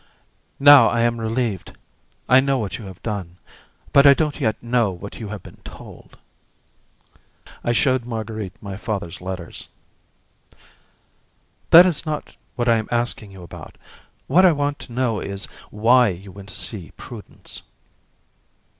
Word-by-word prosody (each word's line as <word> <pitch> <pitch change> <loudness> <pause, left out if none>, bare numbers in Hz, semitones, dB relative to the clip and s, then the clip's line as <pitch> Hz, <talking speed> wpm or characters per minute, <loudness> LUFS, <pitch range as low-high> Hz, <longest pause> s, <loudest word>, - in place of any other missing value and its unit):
"Now 140 -4 +9
I 115 - 0
am 120 0 +1
relieved. 110 -4 -2 0.5
I 125 +1 +6
know 135 0 +1
what 105 -4 -4
you 110 - -9
have 95 -2 -10
done, 95 -5 -5 0.6
but 140 0 +7
I 140 - +8
don't 150 -1 -1
yet 110 -5 -1
know 120 -2 +1
what 95 +2 -9
you 110 - -6
have 105 -2 -7
been - - -14
told." - - -13 1.5
I 120 - +1
showed 130 +1 +2
Marguerite 110 -4 -5
my 100 -2 -6
father's 100 -7 -5
letters. 90 -2 -7 2.0
"That 170 +2 +10
is 170 -5 +1
not 155 -2 -5 0.2
what 120 -2 -1
I 115 -1 +5
am 110 - -3
asking 120 -3 -1
you 95 -2 -12
about. 85 - -11 0.5
What 175 +8 +4
I 180 -3 +6
want 145 0 -2
to - - -11
know 120 -4 0
is 100 +1 -5 0.2
why 120 +4 +4
you 95 0 -6
went 100 +1 -12
to - - -6
see 95 -2 -3
Prudence." 115 -5 -10
115 Hz, 150 wpm, -21 LUFS, 100-130 Hz, 2.0 s, That